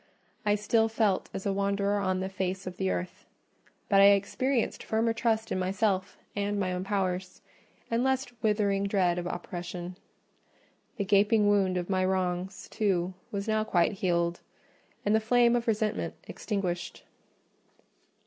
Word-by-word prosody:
I 205 - +4
still 220 +2 +2
felt 220 -4 +1
as 190 - -6
a 200 - +1
wanderer 200 +1 +1
on 185 -1 0
the 190 - -2
face 190 0 -3
of 185 -1 -6
the 95 - 0
earth; 90 0 -4 0.6
but 195 0 +5
I - - +8
experienced 210 +6 +2
firmer 225 +1 0
trust 225 -1 0
in - - 0
myself 190 +1 0 0.2
and 205 0 -1
my 185 -2 0
own 180 0 -2
powers, 185 -2 -2 0.5
and 230 +2 +2
less 265 0 +1 0.2
withering 205 -2 +1
dread 185 -3 +2
of 175 - -4
oppression. 175 0 -5 1.0
The 200 - -1
gaping 205 +2 +4
wound 195 -3 +2
of 175 -1 -2
my 185 -1 +1
wrongs, 185 0 -1
too, 185 -4 0 0.2
was 200 +1 -3
now 215 0 +2
quite 175 -5 +2
healed; 175 -3 0 0.6
and 205 - +3
the 220 - +5
flame 240 +2 +4
of 240 0 -1
resentment 215 -1 0
extinguished. 185 -5 -3
200 Hz, 150 wpm, -29 LUFS, 185-215 Hz, 1.0 s, I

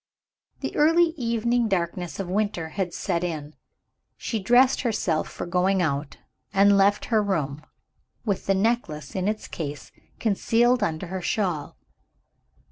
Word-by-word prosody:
The - - -4
early 330 +3 +5
evening 235 -2 0
darkness 175 -2 -2
of 195 - -3
winter 185 -4 -1
had 180 +1 -2
set 175 -1 -2
in. 155 -4 -4 0.6
She 225 - -3
dressed 245 +6 +4
herself 205 -10 0
for - - -6
going 185 +2 +1
out, 145 -4 -1 0.3
and 200 0 +5
left 200 +1 +3
her 215 - +5
room, 155 -8 -2 0.6
with 200 -4 -2
the 195 - +3
necklace 190 - -1
in 185 0 -1
its 215 0 -2
case, 145 -3 -6 0.3
concealed 235 +3 +2
under 160 +2 -1
her 185 +1 -5
shawl. 175 -5 -2
195 Hz, 135 wpm, -25 LUFS, 170-225 Hz, 0.6 s, early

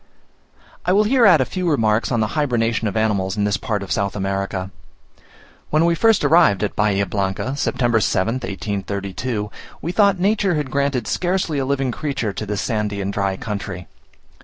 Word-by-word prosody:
I 180 - +2
will 205 +2 +5
here 235 +1 +4
add 170 -7 +6
a - - +2
few 180 +3 -2
remarks 115 -6 +1
on 120 -2 +1
the 110 - 0
hybernation 115 -6 0
of 105 - -2
animals 100 -3 0
in 105 - +1
this 105 -1 +1
part 105 -3 -2
of 100 - -8
South 100 -1 0
America. 95 -1 -3 1.0
When 155 +2 +3
we 170 - +3
first 225 +4 +3
arrived 155 - +4
at 105 - -2
Bahia 100 -2 +2
Blanca, 100 +7 -2
September 120 -4 +1
7th, 110 +5 0
1832, 100 +1 -4 0.3
we 165 - -3
thought 200 0 +3
nature 195 -1 +1
had 150 -4 -2
granted 140 -4 0
scarcely 175 -4 -1
a 135 - -1
living 135 -1 0
creature 130 -6 -3
to 105 - -5
this 105 -1 -2
sandy 105 -3 -2
and 100 0 -3
dry 100 -1 -1
country. 95 -4 -5
110 Hz, 180 wpm, -21 LUFS, 100-150 Hz, 1.0 s, add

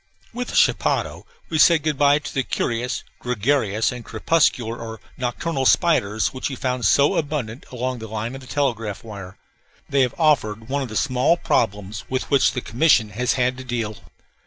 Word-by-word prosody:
With 245 +1 -4
the - - -6
chapadao - - +1 0.2
we 160 - 0
said 165 -1 +6
good 155 -1 0
by 145 0 +5
to 150 - -7
the 135 - +1
curious, 125 0 -2 0.2
gregarious, 115 -2 0
and 125 -2 -7
crepuscular 115 -1 +1
or 110 -1 -8 0.2
nocturnal 130 +3 -1
spiders 110 -11 +2
which 130 - -3
we 135 - -5
found 125 -1 -2
so 140 +1 +4
abundant 140 -6 -3
along 125 0 -3
the 110 - -7
line 110 +3 -4
of 135 - -8
the 130 - -13
telegraph 115 -7 -2
wire. 100 -4 -9 0.5
They 140 -1 +2
have 125 -3 +1
offered 115 -8 +1
one 140 +1 0
of 130 - -4
the 110 - -7
small 130 +7 +2
problems 105 - -1
with 130 +2 -3
which 140 - +4
the 125 - -3
commission 115 -1 +3
has 120 +4 0
had 125 -1 0
to - - -7
deal. 115 -4 -3
125 Hz, 180 wpm, -22 LUFS, 110-140 Hz, 0.5 s, said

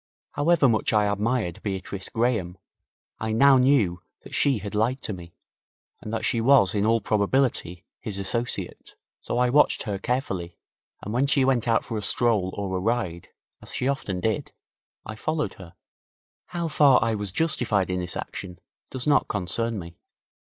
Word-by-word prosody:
However 150 0 +3
much 115 -1 +1
I 105 -1 +4
admired 105 -2 -1
Beatrice 95 -1 -4
Graham, 110 -7 -1 0.6
I 110 0 -2
now 135 +3 +6
knew 120 -10 +3 0.2
that - - -12
she 140 -4 +2
had 100 -1 -7
lied 115 +5 +1
to 105 - -2
me, 85 -2 -11 0.7
and 110 - -7
that 115 0 -2
she 115 -3 +1
was 125 -5 +5
in 105 0 +1
all 115 +1 +3
probability 105 -5 0
his 105 -3 -5
associate. 115 +5 -4 0.2
So - - -3
I 125 0 +2
watched 150 +3 +3
her 100 -2 -3
carefully, 95 -8 -3 0.5
and 105 - -5
when 130 +4 +2
she 140 -2 +3
went 125 -3 +1
out 115 -1 +2
for 115 -3 -3
a - - -6
stroll 105 -3 +1
or 100 -2 -2
a - - 0
ride, 95 -5 -2 0.3
as - - -7
she 125 - -1
often 105 -9 -2
did, 110 +1 -1 0.5
I 110 - -6
followed 155 +6 -2
her. 90 -3 -12 0.7
How 170 -1 -3
far 145 -4 +5
I 115 0 +1
was 105 -2 -3
justified 105 - 0
in 90 - -1
this 90 -1 -2
action 90 -2 -7 0.3
does 130 - -5
not 150 -1 +3
concern 110 +4 -2
me. 85 -2 -9
110 Hz, 170 wpm, -25 LUFS, 95-125 Hz, 0.7 s, now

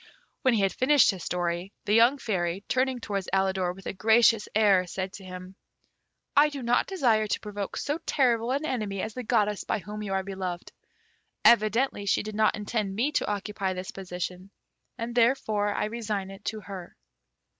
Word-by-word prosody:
When 255 -3 +3
he 210 - +2
had 195 -1 +1
finished 270 -1 +5
his 185 -4 -8
story, 175 +1 -2
the 205 - +1
young 235 +5 +5
Fairy, 185 -6 -2
turning 260 -1 +1
towards 200 -4 -3
Alidor 190 -2 +1
with 195 - -14
a - - -3
gracious 220 +2 +4
air, 200 -4 +4
said 190 +2 -4
to 195 - -10
him, 185 0 -9 0.8
"I 295 +2 +6
do 280 -3 -6
not 240 +1 +2
desire 235 - +2
to - - -1
provoke 205 -2 -5
so 290 +3 -2
terrible 240 -4 +2
an 280 +4 0
enemy 215 -8 -2
as 220 - -4
the 250 - -5
goddess 210 -4 +1
by - - -1
whom 210 +2 -7
you 200 -2 -3
are 190 0 0
beloved. 185 -2 -5 0.7
Evidently 215 -1 +4
she - - +2
did 215 0 -6
not 215 +1 +2
intend 210 -2 -2
me 250 +8 +1
to 300 - 0
occupy 200 -2 -2
this 185 0 -6
position, 180 0 -6 0.5
and 235 0 -4
therefore 230 -4 +2
I - - -1
resign 210 -3 -3
it 195 +1 -13
to 220 -1 -3
her." 185 -2 -9
210 Hz, 185 wpm, -27 LUFS, 190-235 Hz, 0.8 s, I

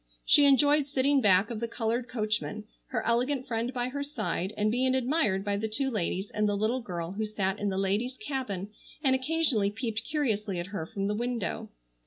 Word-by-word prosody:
She 290 - +6
enjoyed 285 +1 +5
sitting 275 0 +2
back 200 +1 +4
of 225 - -3
the 235 - -2
colored 235 +1 -1
coachman, 215 -1 -2 0.2
her 220 -4 -2
elegant 250 +3 +1
friend 235 +1 -2
by 250 -1 -2
her 285 +2 -3
side, 215 -9 -2
and 215 0 +2
being 255 +2 +2
admired 245 -7 +1
by 200 -1 0
the 220 +2 -1
two 265 +5 -1
ladies 190 -2 -2
and 210 0 +1
the 205 - 0
little 225 +5 0
girl 175 -6 -4
who 215 +3 -2
sat 195 -2 -1
in 205 - 0
the 190 - -2
ladies' 205 +7 0
cabin 250 - -4 0.3
and 265 -2 +4
occasionally 260 -6 +2
peeped 225 0 -3
curiously 220 - -1
at 175 - -3
her 160 -5 -3
from 195 +2 -3
the 205 - 0
window. 235 -2 -2
225 Hz, 200 wpm, -29 LUFS, 205-260 Hz, 0.3 s, She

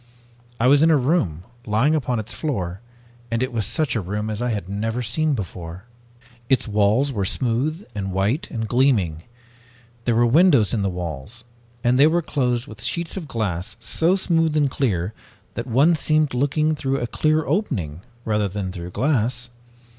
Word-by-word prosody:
I 115 - +2
was 140 +3 +6
in 160 - +5
a 160 - +5
room, 125 - 0 0.2
lying 110 +9 +3
upon 130 -5 0
its 110 +1 -4
floor, 95 - -3 0.5
and 115 +1 0
it 130 - -3
was 110 -4 0
such 155 -5 0
a 110 - 0
room 105 +4 -3
as 110 +2 -4
I 125 - 0
had 105 -6 -3
never 110 +5 -2
seen 150 +6 0
before. 90 -4 -6 0.7
"Its 130 -2 +2
walls 110 +6 +2
were 100 -4 -1
smooth 130 - 0
and 100 -2 -3
white 100 - 0
and 110 -2 -3
gleaming. 105 - +1 0.8
There 120 - +2
were 120 +1 +4
windows 135 - +4
in 110 - +1
the 100 - 0
walls, 90 - -6 0.4
and 125 +2 +3
they 145 - +8
were 170 +2 +1
closed 125 -5 0
with 110 0 -11
sheets 160 +9 -2
of 180 -6 -5
glass 100 -4 -3
so 165 +9 +2
smooth 165 -4 +1
and 145 -3 +2
clear 100 -8 -1 0.4
that 115 - -5
one 140 +8 +4
seemed 155 -2 +1
looking 145 +4 +1
through 135 -2 -1
a 120 - -2
clear 155 +6 +1
opening 85 - -2 0.2
rather 105 -2 +1
than 95 -1 -4
through 90 -1 -7
glass. 120 +1 0
120 Hz, 175 wpm, -22 LUFS, 100-145 Hz, 0.8 s, they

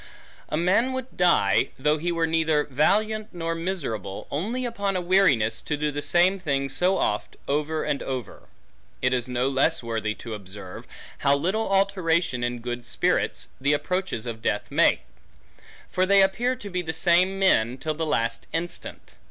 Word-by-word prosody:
A 155 - -1
man 200 +10 +2
would 260 0 -6
die, 170 - +3
though 150 +3 +1
he 175 +3 -1
were 165 -1 +1
neither 160 -2 +2
valiant, 210 +10 +1
nor 165 -2 -3
miserable, 140 - -4
only 225 - -2
upon 200 -5 -2
a - - +1
weariness 175 - +3
to 150 - -2
do 150 0 -1
the 145 0 -3
same 180 +5 +3
thing 140 -5 -1
so 180 +8 +1
oft, 105 - -1
over 150 +2 -1
and 140 - -1
over. 130 -3 -6 0.6
It 125 0 +3
is 125 -1 0
no 125 +1 0
less 135 +2 +2
worthy, 110 -2 -2
to 115 - -8
observe, 100 -2 -8 0.3
how 140 0 +3
little 190 +9 -1
alteration 175 -9 +1
in 120 0 -2
good 120 0 -4
spirits, 120 - 0
the 140 +2 +3
approaches 180 - -2
of 115 -2 -5
death 105 - -2
make; - - +4 0.9
for 185 0 +1
they 200 0 +6
appear 240 +7 +1
to 210 -5 -9
be 180 0 -1
the 160 -2 -4
same 180 +3 +3
men, 125 -11 +3
till 155 +4 -2
the 160 +2 -3
last 115 -6 -1
instant. 170 +2 -5
160 Hz, 170 wpm, -25 LUFS, 125-185 Hz, 0.9 s, they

